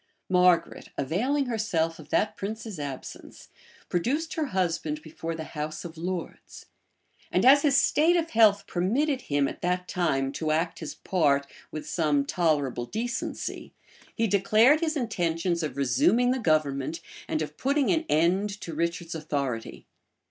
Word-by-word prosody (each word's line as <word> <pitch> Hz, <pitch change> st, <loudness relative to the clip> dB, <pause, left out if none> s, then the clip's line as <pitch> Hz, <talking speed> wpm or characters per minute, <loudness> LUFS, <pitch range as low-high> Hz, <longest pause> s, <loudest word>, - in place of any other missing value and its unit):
Margaret, 180 Hz, -1 st, +3 dB
availing 245 Hz, -, 0 dB
herself 180 Hz, -9 st, -1 dB
of 155 Hz, -, -12 dB
that 215 Hz, 0 st, +1 dB
prince's 215 Hz, -2 st, -6 dB
absence, 140 Hz, -3 st, -8 dB, 0.4 s
produced 280 Hz, -, -1 dB
her 315 Hz, -, -1 dB
husband 165 Hz, -, -1 dB
before 165 Hz, +1 st, -5 dB
the 160 Hz, -, -5 dB
house 155 Hz, +1 st, -5 dB
of 165 Hz, -1 st, -8 dB
lords; 175 Hz, +1 st, -6 dB, 0.7 s
and -, -, +2 dB
as 280 Hz, +2 st, +8 dB
his 280 Hz, -2 st, +3 dB
state 315 Hz, +5 st, +4 dB
of 330 Hz, -1 st, -1 dB
health 210 Hz, -3 st, +5 dB
permitted 255 Hz, -, 0 dB
him 145 Hz, -6 st, 0 dB
at -, -, -7 dB
that 180 Hz, 0 st, -1 dB
time 135 Hz, -7 st, 0 dB
to 155 Hz, +2 st, -3 dB
act 165 Hz, +2 st, 0 dB
his 160 Hz, -, -6 dB
part 145 Hz, -6 st, +1 dB, 0.2 s
with 155 Hz, -, -7 dB
some 150 Hz, -6 st, +1 dB
tolerable 145 Hz, -7 st, 0 dB
decency, 240 Hz, +4 st, -4 dB, 0.4 s
he 225 Hz, -, +1 dB
declared 215 Hz, +8 st, +4 dB
his 320 Hz, -2 st, -1 dB
intentions 175 Hz, -, -1 dB
of 145 Hz, -4 st, -4 dB
resuming 180 Hz, -, +3 dB
the 260 Hz, -, 0 dB
government, 155 Hz, -, 0 dB, 0.3 s
and 155 Hz, -, -1 dB
of 150 Hz, 0 st, -7 dB
putting 280 Hz, -, +1 dB
an 325 Hz, -1 st, +1 dB
end 175 Hz, +6 st, +2 dB
to 165 Hz, -, -6 dB
Richard's 170 Hz, +1 st, -2 dB
authority. 140 Hz, -7 st, -4 dB
175 Hz, 150 wpm, -27 LUFS, 155-225 Hz, 0.7 s, as